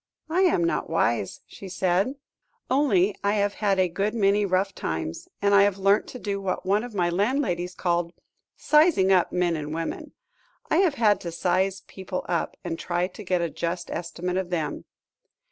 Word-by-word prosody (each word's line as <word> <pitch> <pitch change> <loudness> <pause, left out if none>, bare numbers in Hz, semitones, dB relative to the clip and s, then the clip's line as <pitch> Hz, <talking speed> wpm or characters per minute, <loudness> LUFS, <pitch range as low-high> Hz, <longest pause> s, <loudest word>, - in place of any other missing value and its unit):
"I 360 +3 +2
am 350 - +3
not 170 - -1
wise," 120 -10 0
she 195 - -11
said; 190 +8 0 0.6
"only 210 -9 +3
I 200 +1 +2
have 205 -1 +1
had 200 -2 +2
a 185 -1 +3
good 200 +6 -2
many 205 -1 +2
rough 190 +1 +1
times, 80 0 -4 0.2
and 200 0 +3
I 200 - +7
have 200 -1 +2
learnt 195 +1 +3
to - - -8
do 200 -4 -3
what 190 -1 -3
one 200 +3 +2
of 245 -3 -8
my 175 -3 +2
landladies 180 -3 0
called, 175 -1 0 0.5
'sizing 300 - +4
up 185 -2 +3
men 180 -2 +1
and 150 0 -4
women.' 165 0 -5 0.6
I - - +4
have 360 -6 +3
had 215 -5 +3
to 170 - -5
size 185 +3 0
people 190 -1 -6
up, 170 -2 -2
and 165 -2 -4
try 175 0 -1
to 210 - -10
get 180 -2 0
a 170 - -1
just 175 +1 -4
estimate 175 +1 -3
of 190 -2 -2
them." 165 -4 -3
190 Hz, 185 wpm, -25 LUFS, 175-205 Hz, 0.6 s, I